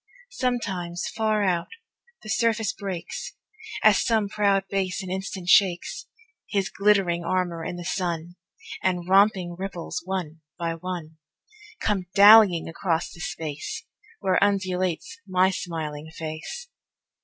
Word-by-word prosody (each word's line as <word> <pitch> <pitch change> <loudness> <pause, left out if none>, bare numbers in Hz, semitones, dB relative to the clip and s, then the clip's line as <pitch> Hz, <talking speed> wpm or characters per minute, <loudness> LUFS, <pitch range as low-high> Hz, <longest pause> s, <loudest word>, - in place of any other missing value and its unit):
Sometimes, 195 - -2
far 215 -1 +1
out, 175 -3 +1 0.6
the 215 - -9
surface 220 -1 +1
breaks, 195 -5 -6 0.5
As - - +6
some 220 -4 +1
proud 200 -2 +2
bass 195 0 -2
an 185 - -6
instant 190 -1 -4
shakes 185 -2 +3 0.4
His 195 -2 0
glittering 195 -4 +2
armor 175 -1 -1
in 175 - -4
the 175 -1 -7
sun, 175 -2 -2 0.5
And 180 -2 0
romping 190 -2 +3
ripples, 190 -3 -4
one 175 -4 -4 0.2
by 170 -2 -2
one, 165 -2 -6 0.6
Come 195 -4 0
dallyiong 200 -4 +8
across 165 0 -2
the 175 - -13
space 155 0 -5 0.4
Where 190 -1 +2
undulates 185 - -1
my 185 0 +3
smiling 160 -4 -5
face. 160 - -6
185 Hz, 120 wpm, -25 LUFS, 170-200 Hz, 0.6 s, dallyiong